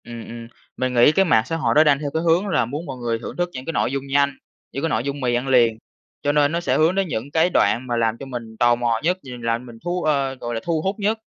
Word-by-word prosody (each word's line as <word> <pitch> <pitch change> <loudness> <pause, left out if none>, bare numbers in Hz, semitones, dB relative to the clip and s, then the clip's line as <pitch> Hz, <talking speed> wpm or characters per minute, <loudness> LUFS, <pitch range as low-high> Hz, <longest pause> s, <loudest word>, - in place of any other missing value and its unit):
Ừm, 120 -1 -9
ừm. 115 0 -8 0.3
Mình 130 0 -1
nghĩ 120 +4 +6
cái 195 +4 +3
mạng 110 -10 +4
xã 165 - -3
hội 160 - 0
nó 155 - +7
đang 145 -3 +3
theo 145 -1 -3
cái 160 +1 -1
hướng 170 +4 +2
là 150 -10 +1
muốn 145 +8 -5
mọi 135 -4 -6
người 120 -2 -2
thưởng - - -8
thức 175 0 0
những 130 0 -7
cái 165 - -4
nội 130 - 0
dung 140 0 -4
nhanh, 140 0 +1 0.3
những 140 - -5
cái 165 - +1
nội 115 -5 0
dung 140 +1 -4
mì 125 -2 0
ăn 125 +2 -2
liền, 120 -4 +4 0.4
cho 145 - +1
nên 145 0 +3
nó 170 - 0
sẽ 175 - 0
hướng 160 +4 +3
đến 195 -1 +1
những 135 -1 -4
cái 160 +3 +3
đoạn 115 +5 +2
mà 120 -1 -1
làm 115 -1 +1
cho 135 - -8
mình 120 -4 -7
tò 120 +1 +4
mò 120 -1 0
nhất 180 +3 +1
và 125 -2 -8
làm 115 0 -1
cho - - -13
mình 120 -2 -12
thú 175 +1 -2
ơ, 140 -3 0
gọi 120 -2 -5
là, - - -1
thu 165 -2 -1
hút 190 +4 -1
nhất. 210 +2 +1
135 Hz, 310 wpm, -22 LUFS, 120-160 Hz, 0.4 s, nó